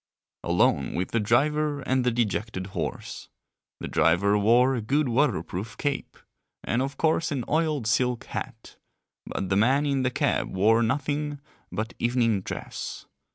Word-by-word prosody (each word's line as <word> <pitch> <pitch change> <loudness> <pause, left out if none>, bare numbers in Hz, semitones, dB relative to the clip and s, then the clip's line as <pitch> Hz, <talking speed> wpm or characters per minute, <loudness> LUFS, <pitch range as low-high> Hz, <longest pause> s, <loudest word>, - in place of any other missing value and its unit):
Alone - - +2
with 90 - -2
the 115 - +1
driver 145 +7 +1
and 130 -1 +1
the 125 - +3
dejected 110 -4 -1
horse. - - -5 0.5
The - - -5
driver 85 +6 +3
wore 120 +6 +4
a 120 - -1
good 140 +7 +1
waterproof 110 - -1
cape, 145 -1 -3 0.5
and 120 - 0
of 135 +1 -3
course 160 0 +1
an 130 -5 -2
oiled 155 -5 0
silk 125 +1 +1
hat, - - -7 0.5
but 95 - -3
the 95 - +2
man 130 +7 +3
in 140 -2 +1
the 130 - +1
cab 125 - 0
wore 110 +5 +4
nothing 145 +4 -1 0.3
but 110 +5 -3
evening 120 -4 +1
dress. - - -6
120 Hz, 150 wpm, -26 LUFS, 105-140 Hz, 0.5 s, wore